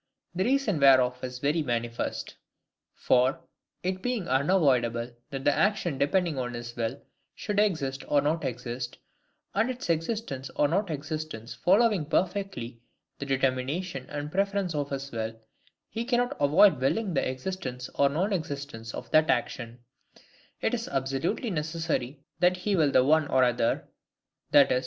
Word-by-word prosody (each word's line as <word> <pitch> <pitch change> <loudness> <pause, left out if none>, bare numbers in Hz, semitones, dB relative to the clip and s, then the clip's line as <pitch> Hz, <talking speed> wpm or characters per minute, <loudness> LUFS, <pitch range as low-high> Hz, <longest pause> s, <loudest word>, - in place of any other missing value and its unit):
The 185 +2 0
reason 250 - +1
whereof 130 -2 +5
is 125 0 -4
very 145 +5 +1
manifest. 120 -4 -3 0.6
For, 130 +1 +2 0.4
it 185 +1 -2
being 245 -5 -2
unavoidable 130 -5 +2 0.2
that 135 -2 -5
the 145 - +5
action 195 -8 +1
depending 165 0 +1
on 125 -1 -3
his 120 0 -7
will 115 +3 -2 0.4
should 205 -1 -2
exist 140 -10 0
or 145 - +3
not 150 +3 0
exist, 125 -1 -4 0.6
and 220 +5 +2
its 250 -8 -2
existence 165 - -2
or 145 - +3
not 190 +5 0
existence 155 -6 -5
following 200 -4 +3
perfectly 180 - -2 0.4
the 140 - -5
determination 135 +3 -1
and 145 0 -5
preference 195 -1 0
of 145 -2 -2
his 140 0 -4
will, 115 0 -4 0.5
he 230 - -4
cannot 245 0 +1
avoid 155 +2 +5
willing 195 +8 +1
the 140 - +1
existence 130 -3 -5
or 140 0 +3
non 185 +9 0
existence 140 -9 -5
of - - -8
that 155 0 +4
action; 120 -1 -1 0.8
it - - 0
is - - -2
absolutely 135 - -1
necessary 155 -4 -2 0.2
that 180 +1 +4
he 195 +2 0
will 155 -5 +3
the 130 - +4
one 155 +1 +4
or 130 -2 +3
the 115 -1 0
other; - - -27 0.6
i.e. 140 -3 +6
145 Hz, 150 wpm, -28 LUFS, 130-185 Hz, 0.8 s, i.e